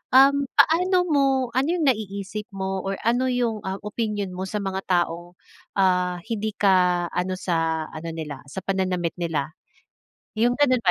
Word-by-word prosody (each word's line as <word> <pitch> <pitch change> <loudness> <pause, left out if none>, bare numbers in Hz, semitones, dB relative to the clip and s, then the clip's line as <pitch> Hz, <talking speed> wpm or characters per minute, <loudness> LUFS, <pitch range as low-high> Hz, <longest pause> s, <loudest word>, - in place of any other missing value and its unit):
Um, 275 +1 +6
paano 360 +3 +4
mo 295 -6 +2 0.3
ano 260 +4 +1
yung 340 - -1
naiisip 210 -4 -1
mo 190 0 -2
or 195 +1 -3
ano 245 +3 +2
yung, 240 -3 0
ah, 190 - -2
opinyon 210 -2 -2
mo 185 +1 -4
sa 210 +2 -3
mga 190 0 -2
tao, 175 -1 0 0.4
ah, 180 -2 +2
hindi 215 -1 -2
ka 180 -3 +3
ano 180 +1 -1
sa 165 -3 -1
ano 160 +1 -6
nila 150 -4 -6
sa 150 +7 -6
pananamit 185 -3 0
nila? 160 -4 -2 0.9
Yung 240 +2 +3
gano'n 255 -4 +3
ba 185 - +4
195 Hz, 160 wpm, -24 LUFS, 180-235 Hz, 0.9 s, Um